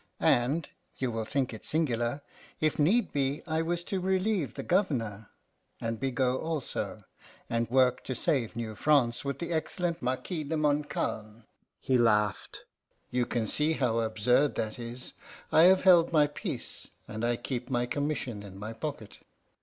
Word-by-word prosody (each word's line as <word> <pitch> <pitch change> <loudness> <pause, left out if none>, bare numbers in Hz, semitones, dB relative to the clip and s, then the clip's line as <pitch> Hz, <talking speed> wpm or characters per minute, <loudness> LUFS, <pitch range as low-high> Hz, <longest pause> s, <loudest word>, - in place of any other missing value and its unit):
And 140 +7 +2 0.3
you 130 -2 -1
will 110 -1 -2
think 135 0 -1
it 110 - -9
singular 140 -3 0 0.4
if 155 -1 +1
need 200 +11 +3
be, 140 0 0
I 160 -1 0
was 170 +1 -1
to 190 +2 -2
relieve 190 -3 0
the - - -5
Governor 115 - 0 0.5
and 115 -1 -3
Bigot 130 -1 0
also, 160 -5 -3 0.5
and 115 0 0
work 125 0 +3
to 130 - -2
save 125 -5 0
New 115 -2 -4
France 125 -1 +2
with 140 -1 -2
the 170 0 -3
excellent 170 +1 -1
Marquis 130 +6 -2
de 155 +2 -2
Montcalm." 145 -7 -1 0.4
He 130 -2 +2
laughed. 105 -4 +1 0.5
"You 125 -1 +1
can 115 -2 -1
see 150 +8 +1
how 125 -6 +1
absurd 115 +5 +2
that 110 +2 -3
is. 120 +2 -7 0.4
I 160 - +7
have 185 +1 +6
held 175 -3 +6
my 150 -2 +5
peace, 145 - -5 0.2
and 110 +1 -5
I 120 0 +2
keep 125 +1 -4
my 120 -2 +1
commission 130 -5 -2
in 100 -2 -10
my 105 +3 -6
pocket." 115 -3 -6
130 Hz, 160 wpm, -29 LUFS, 115-155 Hz, 0.5 s, I